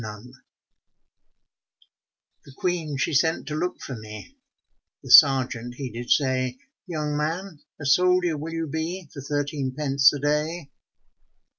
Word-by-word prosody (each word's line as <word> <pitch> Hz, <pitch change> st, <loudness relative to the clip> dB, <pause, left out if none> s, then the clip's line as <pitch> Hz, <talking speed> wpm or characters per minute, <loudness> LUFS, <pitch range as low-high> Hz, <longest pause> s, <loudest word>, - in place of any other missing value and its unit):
GRENADIER 110 Hz, +4 st, -10 dB, 2.0 s
The 140 Hz, -, -14 dB
Queen 160 Hz, -2 st, -2 dB
she 140 Hz, -, -1 dB
sent 160 Hz, +3 st, +1 dB
to 150 Hz, -, -4 dB
look 180 Hz, +3 st, -2 dB
for 130 Hz, -, -7 dB
me, 110 Hz, -, -10 dB, 0.7 s
The -, -, -6 dB
sergeant 130 Hz, -4 st, +6 dB
he 130 Hz, -1 st, -6 dB
did 120 Hz, +2 st, -7 dB
say, 130 Hz, -2 st, +1 dB, 0.3 s
'Young 150 Hz, -4 st, -3 dB
man, 160 Hz, +3 st, -3 dB, 0.2 s
a 145 Hz, -, -7 dB
soldier 180 Hz, +3 st, +3 dB
will 155 Hz, +3 st, -6 dB
you 165 Hz, 0 st, -3 dB
be 160 Hz, +4 st, -4 dB
For 140 Hz, -, -8 dB
thirteen 145 Hz, -2 st, -3 dB
pence 140 Hz, -2 st, +4 dB
a 145 Hz, -, -4 dB
day?' 150 Hz, +2 st, -2 dB
145 Hz, 135 wpm, -24 LUFS, 130-160 Hz, 2.0 s, sergeant